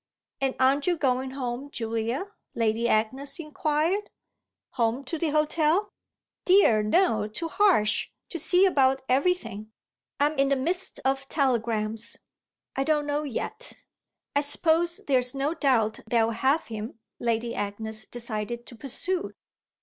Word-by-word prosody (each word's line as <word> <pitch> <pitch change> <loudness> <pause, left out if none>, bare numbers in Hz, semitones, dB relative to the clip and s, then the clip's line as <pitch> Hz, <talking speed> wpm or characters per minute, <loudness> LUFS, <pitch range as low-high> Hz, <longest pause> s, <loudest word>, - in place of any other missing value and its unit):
"And 270 -1 0
aren't 270 +3 +3
you 350 -1 +2
going 260 -2 0
home, 260 0 -4
Julia?" 230 - -3 0.2
Lady 230 +1 +1
Agnes 265 +6 0
inquired. 315 +5 -1 0.6
"Home 240 +1 0
to 310 +5 -4
the 330 - 0
hotel?" 310 +6 +2 0.5
"Dear, 360 - +5
no, 215 - +2
to 330 +10 -4
Harsh 330 - +3 0.2
to 340 - -4
see 360 +5 +5
about 270 -7 +3
everything." 255 - 0 0.5
"I'm 295 +2 +3
in 275 0 +3
the 275 - +3
midst 350 +8 -2
of 270 +1 0
telegrams. 230 -4 0 0.6
I 270 - +1
don't 300 0 +1
know 290 0 0
yet." 300 - -4 0.6
"I 285 - +4
suppose 330 +3 +2
there's 255 -2 +2
no 275 +3 0
doubt 255 -9 +1
they'll 230 -1 +3
have 265 +7 +1
him," 220 0 -6 0.2
Lady 235 0 -1
Agnes 215 +2 -4
decided 235 0 -3
to 240 - -11
pursue. 345 - -2
270 Hz, 135 wpm, -26 LUFS, 230-310 Hz, 0.6 s, Dear